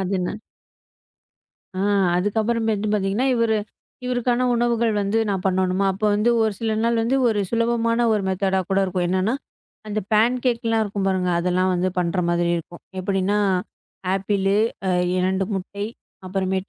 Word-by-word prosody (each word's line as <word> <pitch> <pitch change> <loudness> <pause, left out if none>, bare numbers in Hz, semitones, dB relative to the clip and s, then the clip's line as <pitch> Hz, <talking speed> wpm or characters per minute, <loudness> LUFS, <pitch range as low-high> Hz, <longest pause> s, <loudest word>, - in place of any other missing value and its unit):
அது 190 +1 -1
என்ன? 180 - -2 1.5
ஆ - - 0 0.4
அதுக்கு 205 +4 0
அப்புறம் 230 +1 0
வந்து 210 +1 -2
பாத்தீங்கன்னா 205 +5 0
இவரு 230 -2 +2 0.5
இவருக்கான 250 0 0
உணவுகள் 235 -1 +1
வந்து 200 +3 0
நான் 190 -2 -1
பண்ணனுமா! 190 0 +1
அப்போ 210 +3 -1
வந்து 210 +3 +2
ஒரு 220 - +1
சில 225 -1 0
நாள் 235 0 +2
வந்து 235 +4 +1
ஒரு 210 -2 +1
சுலபமான 230 0 +1
ஒரு 210 -2 +1
மெத்தேடா 190 0 +1
கூட 195 - +2
இருக்கும். 180 -1 -1
என்னன்னா 190 +6 +1 0.5
அந்த 210 0 -1
பேன்கேக்லாம் 230 0 +2
இருக்கும் 200 -1 -3
பாருங்க. 185 -1 0
அதெல்லாம் 180 +1 +1
வந்து 180 +1 +1
பண்ற 180 +1 0
மாதிரி 175 0 +1
இருக்கும். 170 +1 -8 0.2
எப்பிடின்னா 195 +2 0 0.8
ஆப்பிள் 195 0 0 0.4
அ - - +2 0.3
2 190 +1 +1
முட்டை. 200 +2 -4 0.4
அப்புறம் 190 0 -1
200 Hz, 145 wpm, -22 LUFS, 185-230 Hz, 1.5 s, இவரு